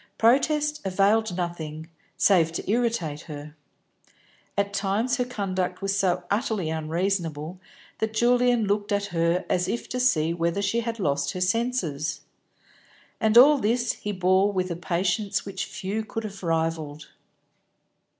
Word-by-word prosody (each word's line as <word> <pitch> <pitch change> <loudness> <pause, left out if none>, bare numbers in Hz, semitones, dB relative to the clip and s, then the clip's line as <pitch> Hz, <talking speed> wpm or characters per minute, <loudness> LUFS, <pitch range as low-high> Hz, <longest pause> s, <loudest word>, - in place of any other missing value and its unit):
Protest 300 +5 +2
availed 195 +1 +2
nothing, 160 -3 -4 0.3
save 170 -5 +4
to - - -5
irritate 215 -9 0
her. 150 0 -8 1.0
At 200 0 0
times 205 +5 0
her 250 - 0
conduct 190 -5 -3
was 195 0 0
so 180 -2 +1
utterly 205 - 0
unreasonable 165 0 -2 0.4
that 220 0 -2
Julian 245 0 +3
looked 205 +1 -1
at 200 0 +1
her 170 +2 +1
as 180 0 +1
if 235 +5 -3
to 250 - -3
see 170 -11 +2
whether 170 +2 -1
she 200 +4 0
had 230 0 -3
lost 140 -7 0
her 185 - -4
senses. 180 - -1 1.0
And 220 +1 +3
all 285 +4 +8
this 240 +2 +1
he 210 - -5
bore 190 +1 +3
with 185 -2 -1
a - - -2
patience 180 +4 -1
which 195 -1 -4
few 205 +4 -4
could 225 +1 -5
have 200 -2 -7
rivalled. 160 -3 -2
195 Hz, 140 wpm, -25 LUFS, 170-220 Hz, 1.0 s, all